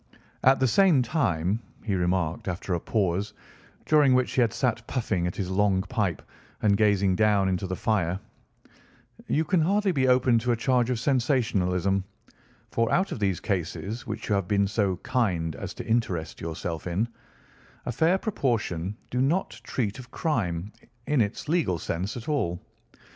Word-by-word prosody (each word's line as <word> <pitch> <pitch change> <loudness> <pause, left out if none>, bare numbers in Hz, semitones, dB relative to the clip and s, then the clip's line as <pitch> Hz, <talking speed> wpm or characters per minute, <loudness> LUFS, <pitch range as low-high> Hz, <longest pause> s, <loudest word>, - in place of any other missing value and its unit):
"At 135 +1 +5
the 130 - +3
same 165 - +4
time," 110 - 0 0.2
he 105 - -1
remarked 90 -2 0
after 90 +1 -3
a 85 - 0
pause, 100 0 -1 0.5
during 145 -4 +5
which 130 -1 +2
he 130 - +2
had 115 - +3
sat 120 -3 -1
puffing 100 -8 -1
at 90 - -4
his 95 -2 -3
long 95 -1 +2
pipe 105 - -2 0.4
and 100 -2 +4
gazing 100 -2 +3
down 105 -2 +3
into 95 0 -1
the 95 - -3
fire, 95 -3 0 1.1
"you 160 +2 +1
can 175 +1 +2
hardly 200 +4 +2
be 135 -6 +1
open 125 -2 +4
to 125 +2 0
a - - -1
charge 125 +1 +2
of 125 -3 0
sensationalism, 100 - +1 0.7
for 115 0 +1
out 190 +2 +2
of - - -4
these 95 -5 0
cases 100 +5 -3
which 110 0 -5
you 105 - +1
have 100 -3 0
been 100 0 +2
so 100 -2 0
kind 90 - 0
as - - -6
to - - -6
interest 105 -8 -1
yourself 80 0 -4
in, 95 +7 0 0.8
a - - -2
fair 160 +9 +3
proportion 110 - -1
do 125 - 0
not 165 +8 +1
treat 110 -2 -2
of 125 -1 -10
crime, 105 - -2 0.3
in 145 -3 +2
its 105 +5 -2
legal 155 - +1
sense, 90 +7 -3
at 120 - -8
all. 110 - 0
110 Hz, 170 wpm, -26 LUFS, 95-130 Hz, 1.1 s, At